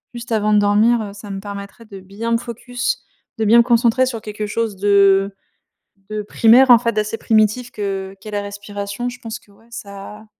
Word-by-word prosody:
juste 240 +1 -8
avant 215 -1 +1
de 210 - +5
dormir. 210 +3 +3
Heu, 205 -2 -7
ça 205 0 -11
me 195 -1 -5
permettrait 200 +3 -9
de 200 -3 -11
bien 200 +5 -6
me 230 - +3
focus, 245 +2 -4 0.3
de 220 - -1
bien 230 +3 +6
me - - +6
concentrer 240 +1 +3
sur 230 -3 -4
quelque 210 0 -5
chose 220 -1 -2
de 200 0 +4 0.8
de 215 0 -4
primaire, 235 +5 +5
en 235 - +8
fait, 230 0 0
d'assez 215 +1 -2
primitif, 220 +3 +1
que 195 -2 -4
qu'est 215 +2 -10
la 205 -1 -2
respiration. 205 +2 -6
Je 250 0 -10
pense 225 -2 -6
que, 205 - -25
ouais, 220 +3 -24
ça 210 -1 -10
215 Hz, 200 wpm, -19 LUFS, 200-230 Hz, 0.8 s, en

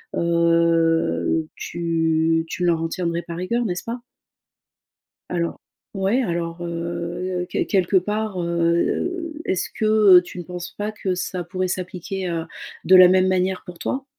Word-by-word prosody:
heu, 165 - +2
tu 165 -1 0
tu 180 - -4
ne - - +3
leur 165 -2 +2
en 165 - -2
tiendrais 170 -1 -2
par 170 0 -8
rigueur, 235 +7 -1
n'est-ce 180 -4 -3
pas? 235 +1 -5 1.3
Alors, 170 -1 -2 0.3
ouais. 195 +6 +1
Alors, 170 -5 -3
heu, 170 +1 -3
quel - - -1
quelque 190 -1 +2
part, 210 +1 -2
heu, 170 - 0
est-ce 185 - -1
que, 220 - -1 0.3
heu, - - +6
tu 180 0 -9
ne - - -5
penses 175 0 -7
pas 210 +1 -2
que 195 -3 -2
ça 180 0 -3
pourrait 185 +2 -2
s'appliquer, 185 +1 -4
heu, 165 -1 -2 0.4
de 190 - +7
la 185 -1 +10
même 185 +1 +4
manière 185 0 0
pour 175 -2 -10
toi? 270 +8 -3
175 Hz, 155 wpm, -22 LUFS, 170-185 Hz, 1.3 s, la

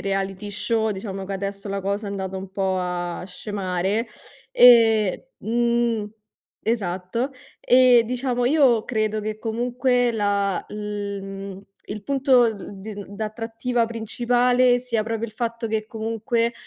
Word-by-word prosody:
reality 195 +1 -2
show, 220 +2 0
diciamo 195 -1 -5
che 200 - -4
adesso 200 +1 -5
la 195 0 -2
cosa 200 +2 -2
è - - -5
andata 190 -1 -4
un 190 0 -7
po' 190 -1 0
a 175 -1 -3
scemare, 195 +2 -2 0.4
e 230 - +6
mhmm 235 -2 0 0.5
Esatto. 215 +3 -1 0.3
Eh, 250 -2 +6
diciamo, 245 0 -1
io 255 -5 +4
credo 215 -2 -1
che 215 0 -4
comunque 245 +1 +1
la 200 -3 0
l 205 -1 -4
mhmm, 195 0 -7 0.3
il 205 0 -6
punto, 270 -2 +4
uhm, 205 -3 -2
d 205 0 -7
d'attrattiva 225 +3 -2
principale 245 +2 +2
sia 240 -3 -1
proprio 225 +1 -3
il 220 - -12
fatto 230 +1 -3
che 215 -1 -2
comunque, 230 +1 -1
220 Hz, 135 wpm, -23 LUFS, 200-240 Hz, 0.5 s, e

